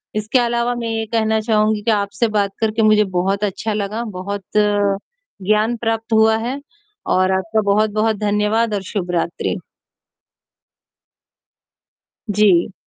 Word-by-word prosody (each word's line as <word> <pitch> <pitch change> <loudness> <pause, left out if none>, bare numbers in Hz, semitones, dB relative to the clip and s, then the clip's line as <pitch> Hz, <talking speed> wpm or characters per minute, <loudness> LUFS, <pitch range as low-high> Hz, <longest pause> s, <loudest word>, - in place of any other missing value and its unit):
इसके 215 +4 +1
अलावा 240 0 0
मैं 235 -1 -4
ये 225 0 -2
कहना 220 -1 +2
चाहूँगी 215 -1 +1
कि 225 - +2
आपसे 200 +2 0
बात 200 -1 +1
करके 220 0 0
मुझे 215 -1 +5 0.2
बहुत 195 +3 0
अच्छा 210 +2 -2
लगा, 210 +3 -3
बहुत 200 -1 -5 1.0
ज्ञान 215 +3 +2
प्राप्त 225 0 -2
हुआ 220 0 +4
है, 250 +5 -3 0.5
और 185 +1 +2
आपका 220 +3 0
बहुत-बहुत 215 +1 +1
धन्यवाद 210 +2 +1
और 200 - -1
शुभरात्रि। 175 -4 -2 2.7
जी। 200 -2 +3
215 Hz, 120 wpm, -19 LUFS, 200-225 Hz, 2.7 s, मुझे